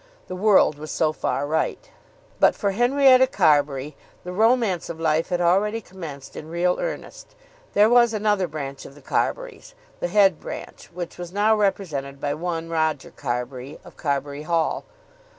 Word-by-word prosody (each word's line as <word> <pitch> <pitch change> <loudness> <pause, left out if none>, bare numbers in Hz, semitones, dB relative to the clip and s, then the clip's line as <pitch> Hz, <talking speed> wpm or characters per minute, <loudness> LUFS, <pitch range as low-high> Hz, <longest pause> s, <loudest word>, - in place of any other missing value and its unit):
The 185 - -5
world 190 -6 +4
was 155 +1 -8
so 155 0 +1
far 140 -2 -2
right. 160 - -2 0.5
But - - +5
for 200 -2 -1
Henrietta 260 +4 +5
Carbury 145 - +2 0.3
the 180 - -6
romance 220 -3 +2
of 165 -1 -6
life 160 0 +1
had 175 -1 0
already 200 +6 +2
commenced 165 -9 -10
in 155 - -8
real 175 +2 +1
earnest. - - -6 0.4
There 210 +1 +5
was 240 0 +5
another 210 -3 +1
branch 140 -3 -6
of 140 - -12
the 145 - -17
Carburys, - - -3 0.2
the - - -1
head 195 -2 +4
branch, - - -9
which 175 0 -7
was 175 -1 -6
now 210 +3 +3
represented 160 -10 -2
by 145 0 -1
one 165 +1 -3
Roger 160 -1 -1
Carbury, 125 +2 -5
of - - -14
Carbury 140 -1 -2
Hall. 165 0 -1
175 Hz, 160 wpm, -23 LUFS, 150-210 Hz, 0.5 s, But